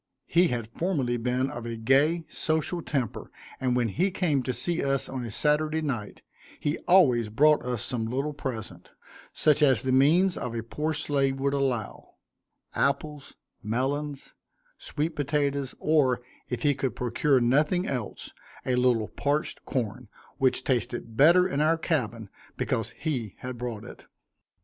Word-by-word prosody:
He 175 +2 +4
had 120 -5 -2
formerly 140 -9 0
been 125 +3 -1
of 120 -1 -6
a 115 - -4
gay, 140 +9 +2
social 160 +2 -1
temper, 130 -9 -3 0.3
and 125 -1 0
when 120 -2 +1
he 180 - +1
came 170 -7 0
to 130 - -2
see 170 +6 -1
us 140 -1 0
on 130 -2 -5
a 120 - -5
Saturday 155 +6 +1
night, 120 -8 -4 0.4
he 145 +2 -1
always 130 - +5
brought 150 +7 +4
us 125 -3 -2
some 115 -3 -2
little 135 +5 -2
present, 130 -6 -6 0.4
such 150 0 +2
as 130 -6 +4
the 130 - 0
means 160 +8 +4
of 120 -1 -4
a 115 - -3
poor 150 +7 -2
slave 140 -2 0
would 140 +1 0
allow 130 -6 -2 0.6
apples, 140 +1 -1 0.3
melons, 135 +6 -2 0.5
sweet 155 +2 -3
potatoes, 140 -2 -1
or, 140 -6 +2 0.3
if 125 - -3
he 145 -1 +4
could 135 -1 -3
procure 125 +3 +2
nothing 150 +9 +2
else, 125 - -4 0.3
a 130 - 0
little 125 -4 +2
parched 145 +2 -2
corn, 120 -1 -3 0.3
which 130 -1 +2
tasted 120 -2 -2
better 170 +8 +6
in 145 -5 -1
our 160 +2 +3
cabin, 120 - -2 0.3
because - - -1
he 125 - -3
had 125 0 -5
brought 120 -3 -5
it. - - -12
135 Hz, 155 wpm, -27 LUFS, 120-150 Hz, 0.6 s, better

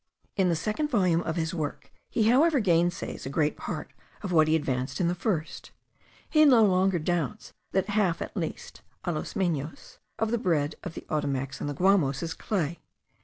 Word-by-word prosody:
In 190 -3 +2
the 170 - +2
second 215 - -1
volume 185 - +2
of 160 -2 -3
his 165 0 -1
work 155 -4 -4 0.2
he 225 - +1
however 285 +5 +5
gainsays 175 - 0
a - - -3
great 150 +1 +1
part - - -6 0.3
of 195 - -3
what 160 -2 +5
he 155 - +3
advanced 135 -3 -2
in 175 - +2
the 175 - +1
first; 175 -3 -3 0.6
he 310 -1 +5
no 250 -7 +7
longer 190 -2 +3
doubts 175 +5 -2 0.2
that 190 +2 0
half 200 -5 +1
at - - -6
least 165 -5 -5 0.2
(a 175 - -1
lo 155 - -2
menos) 160 -5 -3 0.2
of 220 0 0
the 235 - +1
bread 160 - +1
of 180 - -6
the - - -8
Ottomacs 135 -3 -2
and - - -2
the 145 - -4
Guamos 175 -6 +2
is 165 0 -3
clay. 170 -5 -2
175 Hz, 190 wpm, -27 LUFS, 155-200 Hz, 0.6 s, no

